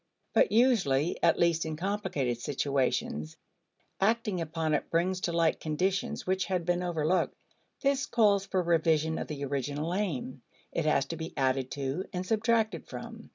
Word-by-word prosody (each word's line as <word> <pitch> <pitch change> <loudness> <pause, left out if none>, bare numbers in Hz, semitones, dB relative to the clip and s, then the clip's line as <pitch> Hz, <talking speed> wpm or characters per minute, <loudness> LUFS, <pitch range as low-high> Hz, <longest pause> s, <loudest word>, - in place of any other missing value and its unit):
But - - +4
usually 185 - +3
at 170 -1 +4
least 170 -1 +2
in 160 -1 -3
complicated 170 - -2
situations 130 - -1 0.6
acting 210 -2 +1
upon 160 -1 -1
it 150 - -1
brings 180 +2 +1
to 175 - 0
light 165 -1 +2
conditions 185 +5 -1
which 190 0 0
had 180 -3 -1
been 175 0 +1
overlooked. 175 0 0 0.5
This 280 0 +1
calls 205 -4 +3
for 185 -2 0
revision 160 -2 +2
of - - -4
the 145 -2 -4
original 145 +4 -2
aim; 145 -10 -2 0.3
it 165 - -1
has 155 -3 +3
to 165 +4 -5
be 160 +1 -6
added 130 -1 +1
to 140 +6 -3
and 180 0 -3
subtracted 225 +1 +1
from. - - -9
170 Hz, 155 wpm, -30 LUFS, 145-190 Hz, 0.6 s, But